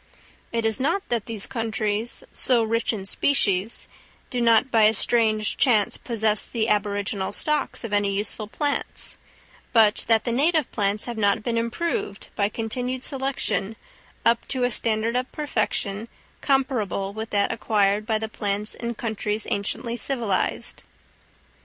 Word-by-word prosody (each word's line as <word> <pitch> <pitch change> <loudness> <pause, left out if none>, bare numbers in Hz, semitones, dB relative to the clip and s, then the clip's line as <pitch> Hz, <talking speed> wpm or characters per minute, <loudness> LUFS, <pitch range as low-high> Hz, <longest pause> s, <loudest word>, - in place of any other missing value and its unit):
It 230 -1 -1
is 220 +2 +1
not 330 +9 0
that 235 -3 -1
these 220 -3 -4
countries, 220 -1 -2
so 245 -3 +4
rich 230 +1 +1
in 205 -4 -5
species, 200 -3 +2 0.4
do 250 -2 -1
not 230 +3 +4
by 225 -2 +5
a 220 +1 +5
strange 215 -1 +2
chance 220 -6 +3
possess 220 -3 0
the 230 -1 0
aboriginal 205 -1 0
stocks 300 -4 -1
of 225 -3 -5
any 205 -1 +2
useful 205 +2 -2
plants, 285 +6 -3 0.5
but 220 -3 +5
that 225 -1 +4
the 240 - -2
native 300 +4 +2
plants 205 -1 0
have 235 -2 -5
not 200 0 +2
been 235 0 -1
improved 230 -1 -2
by 200 0 +2
continued 250 +4 -3
selection 265 -6 -1 0.5
up 230 0 +3
to 255 -2 -2
a 245 - +2
standard 225 +1 +2
of 255 +1 -1
perfection 220 -6 -1 0.3
comparable 245 -8 0
with 220 +1 -5
that 200 -1 +1
acquired 210 -2 +1
by 220 -2 +2
the 220 0 -3
plants 210 0 -2
in 235 0 -5
countries 215 -1 -2
anciently 230 +4 -1
civilised. 235 -5 -1
225 Hz, 145 wpm, -24 LUFS, 210-240 Hz, 0.5 s, by